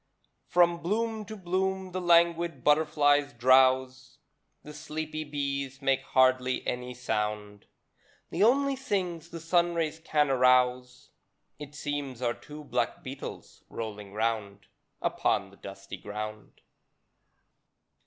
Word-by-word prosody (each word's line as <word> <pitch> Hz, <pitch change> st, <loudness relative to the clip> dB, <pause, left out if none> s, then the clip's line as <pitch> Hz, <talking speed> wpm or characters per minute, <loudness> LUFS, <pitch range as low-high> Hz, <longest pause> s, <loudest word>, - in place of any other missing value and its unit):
From 175 Hz, -1 st, +3 dB
bloom 220 Hz, +4 st, -1 dB
to 215 Hz, +1 st, -8 dB
bloom 190 Hz, 0 st, -2 dB
the 185 Hz, +1 st, -3 dB
languid 170 Hz, -4 st, +3 dB
butterflies 145 Hz, -1 st, +3 dB
drowse; 130 Hz, +1 st, +3 dB, 0.5 s
The 150 Hz, -, -10 dB
sleepy 155 Hz, +1 st, -5 dB
bees 140 Hz, -2 st, -3 dB
make 135 Hz, -2 st, +1 dB
hardly 130 Hz, 0 st, +2 dB
any 125 Hz, 0 st, -4 dB
sound; 105 Hz, -3 st, -3 dB, 0.6 s
The 170 Hz, -, -2 dB
only 275 Hz, +4 st, +3 dB
things 180 Hz, -, -3 dB
the 170 Hz, -, -7 dB
sunrays 165 Hz, -1 st, 0 dB
can 150 Hz, -3 st, +1 dB
arouse, 125 Hz, -1 st, +2 dB, 0.5 s
It 145 Hz, 0 st, -9 dB
seems, 145 Hz, -4 st, -4 dB
are 120 Hz, -1 st, +1 dB
two 150 Hz, +4 st, -11 dB
black -, -, -2 dB
beetles -, -, -8 dB
rolling 105 Hz, -3 st, -7 dB
'round 105 Hz, -2 st, -2 dB, 0.4 s
Upon -, -, 0 dB
the -, -, -18 dB
dusty -, -, -9 dB
ground. 105 Hz, +1 st, -7 dB
145 Hz, 115 wpm, -28 LUFS, 125-170 Hz, 0.6 s, From